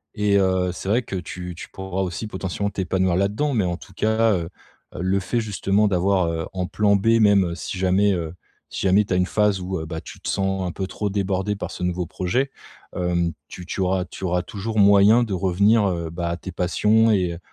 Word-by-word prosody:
et 105 -1 +2
heu, 95 -1 +1
c'est 95 +2 -6
vrai 120 +4 +2
que 100 - -6
tu 90 0 -6
tu - - -9
pourras 95 0 -4
aussi 95 +3 -3
potentiellement, 100 0 -3
t'épanouir 95 -2 0
là-dedans. 105 +10 0
Mais 110 -5 +2
en 85 -1 -1
tout 95 - -15
cas, 110 +3 +2
heu, 85 -3 -2 0.5
le 95 +2 +1
fait 120 +5 -1
justement 105 -1 +1
d'avoir, 95 -1 +2
heu, 80 -1 -3
en 90 -1 -2
plan 100 +2 +2
b 115 +3 +3
même 100 -4 +4
si 90 - -5
jamais, 95 +2 +3
heu 85 -3 -3 0.4
si - - -4
jamais 100 +3 +4
tu 95 - -2
as - - +2
une 90 0 +2
phase 105 -2 +1
où, 95 +1 -3
heu, 80 - -5
bah, 80 0 -6
tu - - -11
te - - -8
sens 95 -1 -1
un - - -3
peu 95 +2 -4
trop 105 +1 -3
débordé 100 0 -1
par 100 - -5
ce - - -7
nouveau 90 -1 -1
projet, 125 - -1 0.5
hem. 85 -1 0 0.2
Tu 90 - -9
tu 95 - -3
auras 95 0 +1
tu - - -11
auras 90 -1 +1
toujours 105 +4 -4
moyen 100 +3 +6
de 110 -4 -2
revenir, 100 +4 +3
heu, 85 -3 -2
bah, 85 +1 -3
à 85 - -2
tes 95 - -8
passions 105 +6 +2
et 90 -5 +1
95 Hz, 225 wpm, -23 LUFS, 90-105 Hz, 0.5 s, moyen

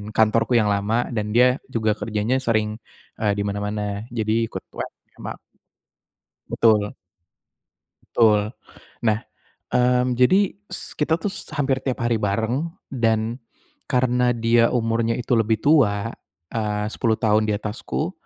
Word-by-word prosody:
kantorku 110 +2 +3
yang 105 -2 +2
lama 105 +4 0
dan 105 -1 -2
dia 125 +1 +5 0.2
juga 110 -1 +2
kerjanya 110 +3 -1
sering, 110 -4 0 0.4
eee, 105 -2 +2
di - - 0
mana-mana, 105 +1 -2 0.3
jadi 110 -2 -1 0.2
ikut - - -6 0.2
WFC - - -7
sama - - -6 1.1
Betul. 105 -2 +2 1.1
Betul. 105 -2 +3 0.6
Nah, 110 -1 +3 0.5
mmm, 125 0 +3
jadi 185 +11 +4
s - - -6
kita 155 +1 +2
tuh 205 - 0 0.2
hampir 135 -2 +1
tiap 130 -3 -2
hari 120 -1 +2
bareng 115 +10 -1 0.2
dan 115 -2 0 0.5
karena 125 -1 +2
dia 115 0 +4
umurnya 115 -1 +1
itu 125 - -3
lebih 110 0 +2
tua, 115 -8 +3 0.4
eee, 105 -2 -1
10 115 -3 +1
tahun 110 -1 +2
di - - +2
atasku. 115 - -3
115 Hz, 130 wpm, -23 LUFS, 105-125 Hz, 1.1 s, dia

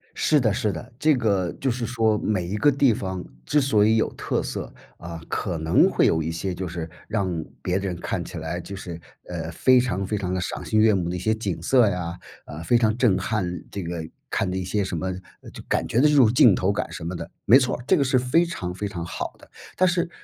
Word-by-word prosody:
是 150 -2 +3
的 110 -5 +2
是 105 0 0
的， 105 +9 -8
这 155 +2 +4
个 100 -8 0
就 135 - +1
是 120 -1 -2
说 110 -3 +1
每 95 -5 -1
一 100 +4 -3
个 145 +8 +4
地 135 -3 +3
方 95 -3 -4 0.2
之 150 - +3
所 130 -7 +3
以 110 - +4
有 110 - +1
特 - - -2
色， - - -5 0.3
啊， 85 -1 -7
可 90 -4 -2
能 80 +1 +4
会 - - +2
有 80 - +2
一 80 +1 -3
些 90 +3 -3
就 95 +1 -4
是 85 -1 -5 0.2
让 95 -7 -1 0.2
别 90 +1 0
人 95 -2 -3
看 - - -3
起 - - -8
来 - - -4
就 100 - -8
是， 85 -3 -7 0.3
呃， - - -4
非 130 0 +4
常 100 -6 -1
非 105 +2 -2
常 90 -2 -2
的 95 - -1
赏 - - -4
心 110 - +2
悦 110 0 +5
目 90 -3 -1
的 90 - -3
一 - - -3
些 110 +5 +1
景 100 -7 -3
色 120 +2 +4
呀， 90 -2 -3 0.3
啊， 75 +2 -8
非 100 +9 +3
常 110 -2 +2
震 115 -7 +3
撼， 90 -5 -2
这 100 - -5
个 85 -1 -4 0.2
看 95 - -1
的 95 - -3
一 95 - -2
些 100 +3 0
什 95 -2 -3
么 95 +3 -2 0.4
就 - - -9
感 - - 0
觉 115 - +1
的 150 - +6
这 150 - +3
种 125 -6 +6
镜 120 -4 +6
头 95 +2 +1
感 100 - -3
什 85 - -7
么 85 +2 -4
的， - - -6
没 125 - +8
错 130 -2 0
儿， 120 - -12
这 - - +4
个 - - +2
是 130 -1 +3
非 125 +7 +3
常 90 - -5
非 105 +2 -3
常 85 -4 -5
好 85 - -5
的。 - - -18 0.3
但 185 - +4
是 175 0 0
100 Hz, 275 characters per minute, -24 LUFS, 90-120 Hz, 0.4 s, 没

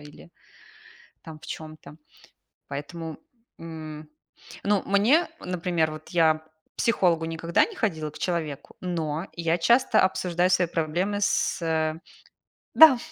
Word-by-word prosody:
или 145 - -14 0.9
там 160 -1 -10
в - - -13
чём-то. 155 -2 -9 0.7
Поэтому, 155 +3 -6 0.4
м. 155 -2 -8 0.6
Ну, 205 -1 +2
мне, 220 - +3
например 175 -3 -1
вот 155 0 -10
я 165 -3 +4
к 155 0 -15 0.3
психологу 175 -8 +2
никогда 165 +1 +1
не 440 - -10
ходила, 160 - -2
к - - -12
человеку, 160 -6 -3
но 165 -1 -3
я 170 0 0
часто 235 +9 +3
обсуждаю 180 -1 +1
свои 180 -1 +3
проблемы 170 +5 -1
с, 200 - +1
э 160 -1 0 0.8
Да, 315 -5 +9
165 Hz, 125 wpm, -26 LUFS, 155-185 Hz, 0.9 s, Да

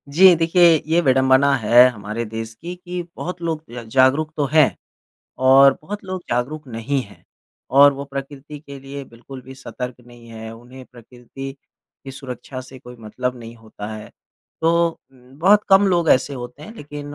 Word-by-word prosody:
जी 185 +2 +8
देखिए 165 -1 +4
ये 165 +2 +2
विड़ंबना 130 0 +3
है 120 +2 +6
हमारे 110 0 -5
देश 115 +1 -6
की 170 +10 -8
कि 180 0 -6
बहुत 180 0 -6
लोग 160 -2 -3
ज 120 0 -7
जागरूक 135 +4 +3
तो 145 - +1
हैं 155 -3 +4 0.6
और 135 +1 +6
बहुत 205 +6 -7
लोग 185 -1 -5
जागरूक 140 +5 -2
नहीं 125 +4 -2
हैं। 100 -3 -17 0.5
और 140 +2 +7
वो 140 0 -7
प्रकृति 140 +1 -8
के 140 -2 -11
लिए 140 +1 -8
बिल्कुल 130 +2 -12
भी 130 +1 -12
सतर्क 125 -2 -7
नहीं 120 -1 -16
हैं, 110 -1 -9
उन्हें 125 +3 -13
प्रकृति 125 +3 -10 0.5
की 135 - -7
सुरक्षा 130 -1 -8
से 130 +1 -12
कोई 125 0 -13
मतलब 125 +3 -4
नहीं 115 0 -10
होता 110 -2 -10
है। 110 0 -9 0.5
तो 170 +1 +3 0.2
म 125 -1 -22
बहुत 200 +6 +5
कम 195 0 +6
लोग 170 -3 +1
ऐसे 135 +2 +2
होते 125 +3 -9
हैं 220 +8 -11
लेक़िन 145 -2 -8
135 Hz, 175 wpm, -20 LUFS, 125-155 Hz, 0.6 s, जी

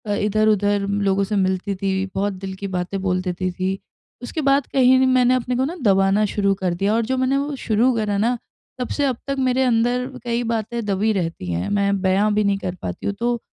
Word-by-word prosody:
इधर-उधर 205 -1 +1 0.2
लोगों 195 +1 +2
से 210 +1 -2
मिलती 190 +1 0
थी 190 0 -1
बहुत 200 +1 0
दिल 190 0 -6
की 200 - -2
बातें 185 +1 -3
बोल 185 -1 0
देती 185 0 -2
थी। 185 +2 -2 0.4
उसके 310 +5 -3
बाद 275 0 +2
कहीं 260 0 +5
मैंने 255 -1 +4
अपने 250 0 -1
को 260 - +1
ना 325 +6 -4
दबाना 195 +1 +3
शुरू 200 -1 +2
कर 180 -2 +1
दिया 200 +4 0
और 230 0 +1
जो 260 +2 -1
मैंने 260 +1 +1
वो 285 0 -2
शुरू 240 +1 +1
करा 210 -2 0
ना, 235 +4 +1 0.4
तब 250 - -2
से 285 - +2
अब 255 -3 0
तक 275 - -1
मेरे 260 0 +2
अंदर 245 +1 +1 0.2
कई 240 0 -1
बातें 230 0 -2
दबी 205 +2 +1
रहती 165 - -3
है, 85 +1 -2
मैं 200 -1 +1
बया 195 +3 +2
भी 210 0 +2
नहीं 200 -1 +1
कर 180 -2 -4
पाती 90 - -5
हूँ 200 - 0
तो, 240 0 0
210 Hz, 215 wpm, -21 LUFS, 195-245 Hz, 0.4 s, कहीं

